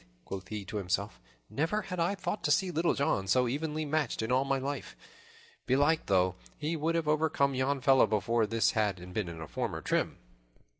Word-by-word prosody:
quoth 95 -1 -6
he 105 -2 -5
to 110 - -5
himself, 100 +2 -2 0.3
"never 170 +9 -1
had 180 -2 -5
I 170 +4 +1
thought 205 +1 -4
to 150 - +2
see 185 +4 +2
Little 165 +1 +1
John 95 -9 0
so 125 +5 +3
evenly 155 +4 -2
matched 145 -6 -1
in 110 - -2
all 130 +1 +3
my 135 0 0
life. 140 +1 -4 0.7
Belike, 145 +5 +2
though, 95 -2 +3 0.2
he 155 +3 -2
would 160 +2 0
have 165 -2 0
overcome 150 -2 +2
yon 130 +1 0
fellow 135 -3 +5
before 110 +1 +1
this 115 +1 +2
had 105 -4 0
he 90 - -10
been 90 0 -3
in 85 -1 -8
his 80 -2 -8
former - - -2
trim." - - -1
135 Hz, 200 wpm, -31 LUFS, 105-155 Hz, 0.7 s, fellow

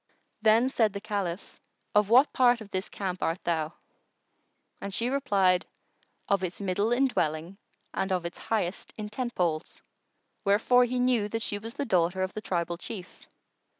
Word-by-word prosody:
Then 225 +3 +5
said 225 -6 +2
the 200 - -4
Caliph, 200 -3 -4 0.3
"Of 210 -1 +4
what 255 +5 +6
part 245 -2 +4
of 210 -2 -11
this 185 0 -2
camp 185 -2 -4
art 165 +3 -1
thou?"; 160 -2 -1 1.1
and 200 - -4
she 235 +5 0
replied, 195 -10 +2 0.6
"Of 200 -1 +2
its 185 -1 -3
middle 200 +3 0
in 255 +3 +4
dwelling 170 - -1 0.3
and 190 0 -1
of 180 -2 0
its 170 - -6
highest 210 -5 -2
in 210 -1 -5
tentpoles."[FN#113] 180 -10 -2 0.6
Wherefore 225 +5 +4
he 250 +1 -2
knew 245 -4 +2
that 225 +1 -2
she 205 - -2
was 225 +4 -8
the 280 - -2
daughter 185 -3 +2
of 185 - -3
the 215 - -5
tribal 170 -3 -2
chief. 190 -4 -8
200 Hz, 165 wpm, -28 LUFS, 180-230 Hz, 1.1 s, what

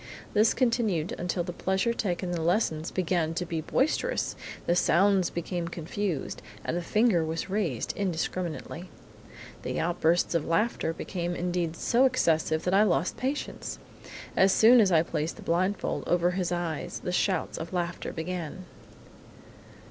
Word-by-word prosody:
This 215 +1 +4
continued 225 - +1
until 175 0 -1
the 175 0 -5
pleasure 190 +6 0
taken 185 -4 -2
in 175 - -1
the 165 - -2
lessons 160 -2 +1
began 170 -3 0
to 180 - -1
be 165 -2 -3
boisterous, 310 - 0 0.3
the 175 - +2
sounds 190 +1 +3
became 170 0 -3
confused, 170 0 -3 0.2
and - - -1
the 175 - -1
finger 210 -1 +3
was 160 +4 -3
raised 180 - -1
indiscriminately. 180 -1 -3 0.7
The - - -3
outbursts 170 0 +1
of 165 -3 +1
laughter 170 +1 0
became 175 +1 -4
indeed 175 -2 -1
so 240 +9 +3
excessive 160 -10 +2
that 180 - 0
I 195 - +6
lost 185 -4 +2
patience! 270 +3 -3 0.6
As 190 0 +5
soon 230 +4 +7
as 195 -3 +3
I 160 -2 +5
placed 160 -1 -2
the - - -11
blindfold 185 +4 0
over 175 0 +3
his 180 -1 -1
eyes 175 0 -3
the 180 - -2
shouts 180 -1 0
of 165 0 -6
laughter 175 -1 -3
began." 175 +1 -5
175 Hz, 150 wpm, -28 LUFS, 165-195 Hz, 0.7 s, soon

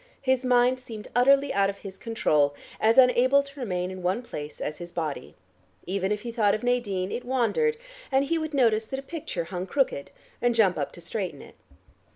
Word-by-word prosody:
His 260 -1 +2
mind 250 0 +3
seemed 225 -4 -9
utterly 275 +3 +4
out 195 0 +3
of 200 - -5
his 190 -1 -8
control, 150 -11 +1 0.2
as 225 +1 +3
unable 260 +2 +6
to 280 0 -13
remain 180 -6 -2
in 185 0 -7
one 185 +7 0
place 150 -10 -7
as 150 - -4
his 175 0 -8
body. 150 - -4 0.5
Even 190 +2 -1
if 210 0 -1
he 235 - -5
thought 215 -4 +2
of 215 - -6
Nadine, 205 -7 0
it 245 - -3
wandered, 265 - +1 0.3
and 270 +1 +3
he 330 +3 0
would 315 -1 -4
notice 225 -4 +3
that 265 - -5
a - - -9
picture 280 - -4
hung 180 +2 -5
crooked, 265 - 0 0.3
and 245 -1 +2
jump 200 -6 +4
up 145 - -3
to 175 - -12
straighten 175 -3 -4
it. - - -14
225 Hz, 200 wpm, -26 LUFS, 185-260 Hz, 0.5 s, unable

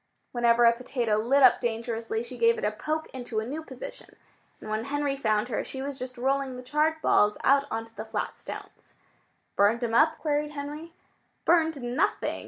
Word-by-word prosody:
Whenever 240 -1 +4
a 235 - +7
potato 235 -2 -1
lit 265 +6 +3
up 255 - +6
dangerously 230 -1 -2
she 240 +1 -8
gave 230 -1 +3
it - - -6
a 210 - +2
poke 310 +9 -3
into 245 -4 -3
a 220 - -3
new 290 +6 -4
position. - - -10 0.4
And - - -10
when 215 +1 -2
Henry 285 0 -1
found 215 -3 0
her, 225 - -1
she 265 - -7
was 275 -1 -5
just 255 0 -6
rolling 270 +1 0
the 250 - -8
charred 305 +5 +1
balls 210 0 +4
out 275 +1 +4
onto 225 0 -5
the 215 0 -6
flat 220 - -3
stones. - - -10 0.6
"Burned 215 +4 +3
'em 230 -1 -1
up?" 310 +6 +4
queried 300 -1 -1
Henry. 300 +3 -7 0.5
"Burned, 320 -5 +3
nothing!" 245 +5 0
250 Hz, 190 wpm, -27 LUFS, 230-290 Hz, 0.6 s, a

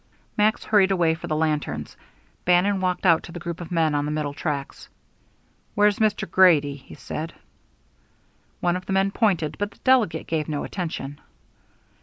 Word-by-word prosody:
Max 215 +1 +2
hurried 205 -3 +4
away 175 -4 +2
for 160 - -7
the 155 - -1
lanterns, 155 -1 -2 0.5
Bannon 180 +3 +3
walked 185 0 -1
out 165 -3 +5
to - - -11
the 175 - -7
group 170 +1 -6
of 170 - -7
men 165 -3 +1
on 145 0 0
the - - -2
middle 150 -2 -2
tracks. 145 -2 -5 0.9
"Where's 205 -1 +3
Mr. 215 -2 +1
Grady?" 160 -6 +4
he 135 - -14
said. 160 +2 -6 1.3
One 175 0 +1
of 185 0 -6
the 195 - -1
men 195 +1 +2
pointed, 180 -9 0
but 205 0 -1
the - - -22
delegate 255 -8 +3
gave 155 -1 -2
no 150 -2 -2
attention. 155 -6 -5
175 Hz, 170 wpm, -24 LUFS, 155-195 Hz, 1.3 s, out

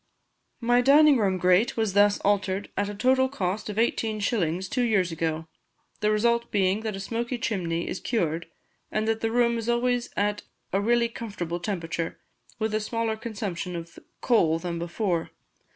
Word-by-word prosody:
My 245 +1 +4
dining 285 +2 +6
room 195 -3 +1
grate 185 +6 +3
was 220 -4 0
thus 205 0 +5
altered 200 -1 0
at 205 +1 -1
a 205 - -5
total 260 +4 +3
cost 210 -4 -3
of 210 - -5
eighteen 225 -1 0
shillings 190 -4 0
two 250 - -1
years 205 -7 +2
ago, 160 0 -2 0.5
the 210 - +1
result 235 +2 +2
being 195 0 +2
that 220 -2 -4
a - - -6
smoky 235 +5 -3
chimney 170 -7 -2
is - - -3
cured, 170 -8 -1 0.4
and 215 0 -1
that 225 0 0
the 225 - +1
room 235 0 +2
is 230 +1 -4
always 245 0 +1
at 205 0 0 0.3
a 195 - +2
really 235 +2 +3
comfortable 200 -7 -5
temperature, 170 -3 -3 0.4
with 220 -1 -1
a 215 - +2
smaller 225 +1 -1
consumption 200 -5 -4
of 170 0 -8 0.2
coal 170 -10 +3
than 170 0 -4
before. 170 0 -1
210 Hz, 170 wpm, -26 LUFS, 180-230 Hz, 0.5 s, dining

